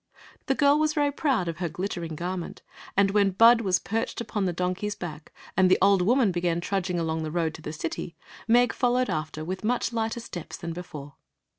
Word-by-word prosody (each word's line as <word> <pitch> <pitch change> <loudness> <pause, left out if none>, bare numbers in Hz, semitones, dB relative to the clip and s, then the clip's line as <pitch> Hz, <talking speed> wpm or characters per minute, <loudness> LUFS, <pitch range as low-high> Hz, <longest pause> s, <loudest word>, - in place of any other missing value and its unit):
The 270 - +2
girl 285 +1 +4
was 310 0 +1
very 290 -1 +2
proud 270 - 0
of 165 -2 -3
her 175 -2 -1
glittering 170 -1 -4
garment, 175 +2 -5 0.3
and 200 0 +4
when 200 -1 +3
Bud 230 +5 +6
was 190 -4 +2
perched 225 +4 -3
upon 210 -4 -2
the 180 - +1
donkey 180 +3 -2
s 210 - -3
back 155 -3 -8 0.2
and 185 0 +4
the - - +5
old 195 -1 +4
woman 230 +2 +3
began 175 -1 0
trudging 180 -1 -1
along 160 -1 -1
the 155 - -3
road 160 -1 -1
to 160 - -10
the 150 - -5
city, 165 +2 -5 0.3
Meg 240 +1 +4
followed 250 +1 +1
after 155 0 -3
with 185 +4 -4
much 240 +1 0
lighter 225 0 -1
steps 175 -8 -7
than 170 -1 -5
before. 150 -5 -9
185 Hz, 205 wpm, -26 LUFS, 170-230 Hz, 0.3 s, Bud